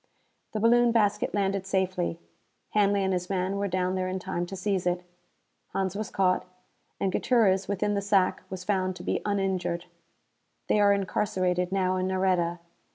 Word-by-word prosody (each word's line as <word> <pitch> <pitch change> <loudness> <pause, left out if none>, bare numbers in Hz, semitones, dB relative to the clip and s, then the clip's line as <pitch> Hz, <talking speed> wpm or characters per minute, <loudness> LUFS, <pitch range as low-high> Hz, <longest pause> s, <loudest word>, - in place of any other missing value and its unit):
The 215 - -1
balloon 235 +2 +5
basket 210 -2 +2
landed 195 -1 0
safely. 185 -3 -1 0.5
Hanley 200 -1 +3
and 190 0 +1
his 180 0 -2
men 190 0 -1
were 200 0 0
down 185 0 0
there 185 -1 -1
in 185 +1 -2
time 175 -1 -3
to 195 - -6
seize 190 -1 -1
it. 180 0 0 0.7
Hans 190 -1 -1
was 215 0 -3
caught; 185 -1 +2 0.6
and 195 - 0
Gutierrez, 195 -4 +2
within 205 +1 0
the 200 - 0
sack, 195 -2 +2
was 185 -1 -6
found 185 -1 0
to 180 - -9
be - - -1
uninjured. 190 -4 -1 0.8
They 210 - +3
are 205 -1 +5
incarcerated 185 -2 0
now 185 -1 +1
in 185 0 0
Nareda. 185 -2 +1
190 Hz, 165 wpm, -27 LUFS, 185-200 Hz, 0.8 s, balloon